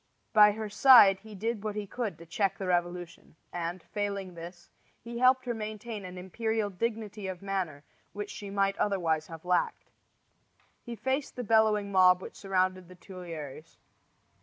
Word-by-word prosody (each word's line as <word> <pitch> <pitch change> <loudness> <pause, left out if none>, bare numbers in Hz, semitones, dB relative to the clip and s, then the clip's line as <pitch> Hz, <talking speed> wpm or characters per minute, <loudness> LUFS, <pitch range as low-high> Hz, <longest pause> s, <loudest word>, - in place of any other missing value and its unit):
By 210 -1 +7
her 220 0 -5
side 205 -3 +7
he 215 +1 -12
did 220 +1 -3
what 210 -1 -3
he 210 -1 -3
could 225 0 -4
to 170 - -12
check 195 +4 -1
the 195 - -4
revolution; 175 -2 -2 0.2
and, 175 0 -4
failing 200 -3 -4
this, 175 +1 -11 0.3
he 235 0 -7
helped 255 +1 +4
her 240 - -1
to 225 - -7
maintain 215 -1 -6
an 180 0 -8
imperial 215 +3 -2
dignity 215 0 -3
of 185 0 -6
manner 185 -7 -3 0.3
which 205 0 -6
she 205 - -7
might 195 0 +1
otherwise 165 -6 0
have 165 0 -10
lacked. 180 0 0 0.9
He 240 -1 -7
faced 265 +5 -2
the 245 - -4
bellowing 215 -2 +3
mob 185 -1 +6
which - - -10
surrounded 185 -2 -1
the 185 - -12
Tuileries. 165 -4 -9
195 Hz, 165 wpm, -29 LUFS, 180-215 Hz, 0.9 s, By